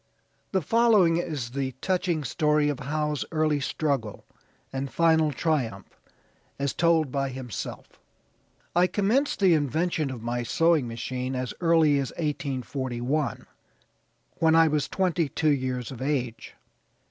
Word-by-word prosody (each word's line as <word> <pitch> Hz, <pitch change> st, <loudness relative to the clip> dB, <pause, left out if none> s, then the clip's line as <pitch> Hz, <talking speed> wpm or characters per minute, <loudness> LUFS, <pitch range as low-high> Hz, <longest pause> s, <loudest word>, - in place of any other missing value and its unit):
The 190 Hz, -3 st, 0 dB
following 215 Hz, -4 st, +4 dB
is 150 Hz, -9 st, -3 dB
the 135 Hz, 0 st, -3 dB
touching 175 Hz, +2 st, -1 dB
story 150 Hz, +2 st, +1 dB
of 145 Hz, -, -3 dB
Howe's 150 Hz, +1 st, -2 dB
early 155 Hz, -2 st, +1 dB
struggle 140 Hz, -7 st, -2 dB, 0.5 s
and 135 Hz, 0 st, -3 dB
final 160 Hz, -2 st, +3 dB
triumph 130 Hz, -, -2 dB, 0.6 s
as 140 Hz, -1 st, -1 dB
told 165 Hz, -4 st, +2 dB
by 135 Hz, 0 st, -1 dB
himself: 125 Hz, -4 st, -7 dB, 0.8 s
"I 175 Hz, +1 st, +5 dB
commenced 215 Hz, +8 st, +1 dB
the 190 Hz, -3 st, +6 dB
invention 155 Hz, +1 st, 0 dB
of 125 Hz, -4 st, -7 dB
my 120 Hz, +1 st, -2 dB
sewing 150 Hz, +4 st, +2 dB
machine 125 Hz, +3 st, -4 dB
as 125 Hz, -1 st, -3 dB
early 160 Hz, -4 st, +4 dB
as 135 Hz, -, -2 dB
1841, 135 Hz, -2 st, -2 dB, 0.9 s
when 160 Hz, 0 st, +4 dB
I 165 Hz, 0 st, +6 dB
was 150 Hz, -2 st, 0 dB
twenty 175 Hz, -5 st, 0 dB
two 155 Hz, +1 st, +1 dB
years 130 Hz, -3 st, -2 dB
of 130 Hz, -, -9 dB
age. 130 Hz, -5 st, -3 dB
150 Hz, 130 wpm, -26 LUFS, 130-165 Hz, 0.9 s, the